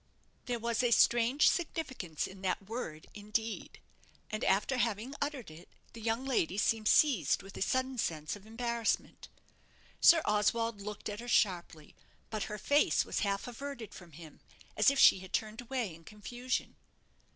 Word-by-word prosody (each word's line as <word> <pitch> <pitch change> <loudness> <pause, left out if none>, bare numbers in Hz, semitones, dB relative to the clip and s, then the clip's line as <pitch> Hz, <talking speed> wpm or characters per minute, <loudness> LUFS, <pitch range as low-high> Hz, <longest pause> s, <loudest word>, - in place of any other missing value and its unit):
There 245 -1 -1
was 235 0 -1
a 245 - +2
strange 240 +4 +4
significance 260 - -2
in 190 0 -10
that 190 +1 -2
word 185 -9 -5
"indeed"; 215 +2 -4 0.5
and 215 - -3
after 210 +7 +2
having 235 +2 -1
uttered 285 - -3
it, 160 +3 -14 0.2
the 230 - -10
young 230 +3 -1
lady 200 -8 0
seemed 215 +1 +1
seized 210 - +4
with 195 0 -12
a - - -7
sudden 260 +4 0
sense 155 -3 -2
of 205 +1 -14
embarrassment. 235 0 -2 0.7
Sir 335 -2 +7
Oswald 210 +1 +1
looked 210 +1 -6
at 210 0 -5
her 240 - -8
sharply; 175 -9 0 0.4
but 215 -2 -2
her 210 - -4
face 285 +8 +2
was - - -2
half 200 +3 -1
averted 245 -2 -7
from 175 -3 -13
him, 155 0 -12 0.4
as - - +5
if 280 - 0
she 190 - +7
had 190 0 -12
turned 220 +2 -2
away 245 -6 -3
in 165 +1 -15
confusion. 240 +6 -4
220 Hz, 165 wpm, -32 LUFS, 195-245 Hz, 0.7 s, Sir